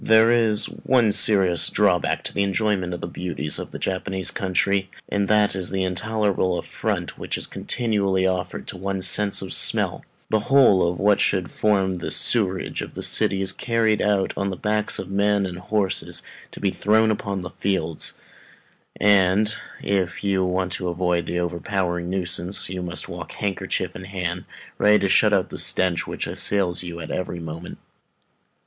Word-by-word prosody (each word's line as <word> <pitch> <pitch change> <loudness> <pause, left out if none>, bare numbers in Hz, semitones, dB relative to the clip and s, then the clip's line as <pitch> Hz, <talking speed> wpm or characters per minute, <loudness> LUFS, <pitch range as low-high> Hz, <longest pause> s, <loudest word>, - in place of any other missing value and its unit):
There 110 +1 +5
is 115 -3 +3
one 120 -5 +1
serious 95 -5 +4
drawback 95 -4 +1
to - - -4
the 100 - 0
enjoyment 100 -2 0
of 90 - -5
the - - -4
beauties 85 -4 -2
of - - -6
the - - -7
Japanese 95 0 -1
country, 95 +1 0 0.2
and 100 -1 0
that 105 -1 +3
is 95 -2 -2
the 95 -1 -1
intolerable 95 -1 0
affront - - -3
which - - -3
is - - -2
continually 100 -5 -1
offered 90 -1 -2
to - - -6
one's 95 0 -1
sense 105 -1 +1
of - - -5
smell; - - 0 0.3
the 110 - +3
whole 125 -10 +5
of 85 - -4
what 105 0 +3
should 95 -3 0
form 95 -3 +1
the - - -4
sewerage 95 -6 +2
of - - -8
the - - -5
city 95 0 +2
is 95 0 0
carried 115 -2 +1
out 100 -2 +1
on 100 0 -1
the 95 - -3
backs 105 +2 0
of 95 - -6
men 100 0 +2
and 90 -1 -6
horses, 100 +1 -2 0.3
to - - -10
be 100 - +1
thrown 110 +3 +3
upon 100 -2 -3
the 90 - -7
fields; 85 -5 -2 0.8
and, 100 +1 +4 0.3
if 95 -3 -1
you 95 -2 +1
would 90 0 -1
avoid 90 -1 -1
the 90 - -2
overpowering 90 0 -2
nuisance, 90 0 -3
you 90 -1 -4
must 90 -1 -4
walk - - -8
handkerchief 100 -2 -3
in 95 - -8
hand, 90 -2 -4 0.3
ready 105 0 +6
to 100 - 0
shut 105 +2 +4
out 95 -3 +2
the - - -4
stench 90 -2 +1
which - - -4
assails 95 -3 +1
you 85 -2 -7
at 80 - -6
every 90 -1 -3
moment. 80 +1 -7
95 Hz, 175 wpm, -23 LUFS, 90-105 Hz, 0.8 s, ready